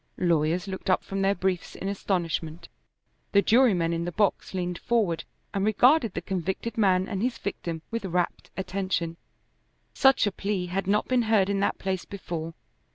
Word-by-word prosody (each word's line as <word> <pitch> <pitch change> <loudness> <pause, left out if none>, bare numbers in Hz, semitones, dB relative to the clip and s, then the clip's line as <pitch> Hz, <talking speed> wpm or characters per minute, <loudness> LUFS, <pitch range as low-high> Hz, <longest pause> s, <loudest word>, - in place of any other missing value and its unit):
Lawyers 170 +1 +1
looked 190 0 -5
up 185 - +3
from 195 0 -3
their 195 +1 +3
briefs 185 -1 -2
in 195 - -5
astonishment. 170 -4 -2 0.6
The 200 0 +5
jurymen 210 -9 +4
in 165 0 -1
the 175 - -3
box 200 0 0
leaned 180 -1 -2
forward 200 -9 0 0.3
and 195 - 0
regarded 230 - +4
the - - -3
convicted 190 +5 -3
man 190 -3 +3
and 200 -3 -3
his 240 0 0
victim 170 -6 -4
with 230 -3 -3
rapt 180 -1 -1
attention. 185 -3 -2 0.8
Such 270 -3 +5
a 205 - +1
plea 195 -1 -2
had 190 +2 -3
not 210 +2 +2
been 255 -1 +3
heard 200 -3 +4
in 200 - 0
that 200 - +1
place 190 -1 -3
before. 165 -4 -6
190 Hz, 170 wpm, -27 LUFS, 175-205 Hz, 0.8 s, The